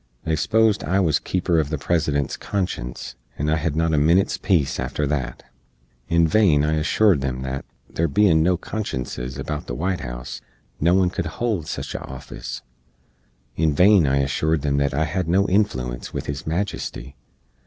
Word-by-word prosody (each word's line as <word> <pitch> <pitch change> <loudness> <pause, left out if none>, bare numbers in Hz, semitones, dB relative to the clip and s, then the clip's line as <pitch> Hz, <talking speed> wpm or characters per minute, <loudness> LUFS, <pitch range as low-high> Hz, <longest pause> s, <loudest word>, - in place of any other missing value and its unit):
They 80 -1 0
sposed 105 +7 +2
I 95 +2 +1
was 80 -6 +2
keeper 85 -3 +1
uv 70 - -9
the 80 - -2
President's 75 -2 0
conscience, 90 -11 -4 0.2
and 75 +2 0
I 80 - +3
hed 75 0 -1
not 80 0 +1
a 75 - +3
minit's 85 +6 +3
peece 85 -8 +1
after 75 - -1
that. 65 -4 -3 0.7
In 85 -1 +4
vain 80 -6 +4
I 75 +1 +1
ashoored 85 -1 +3
em 65 -1 -2
that, 65 +1 -4 0.2
there 85 - -1
bein 80 +1 +4
no 90 +2 +3
consciences 65 - -4
about 75 +2 -4
the - - -4
White 90 +6 -1
House, - - -6 0.4
no 85 +4 +3
one 95 -2 +3
could - - -3
hold 110 -10 -1
sich - - -4
a - - -3
offis; 65 0 -8 0.9
in 80 -2 +1
vain 90 -2 +6
I 70 +1 +2
ashoored 75 +2 0
em 70 -1 +1
that 70 -1 +1
I 80 - +2
hed 85 +2 -2
no 95 +4 +3
influence 65 - 0
with - - -4
His 70 0 -5
Majesty. 80 -6 -3
80 Hz, 175 wpm, -23 LUFS, 70-90 Hz, 0.9 s, vain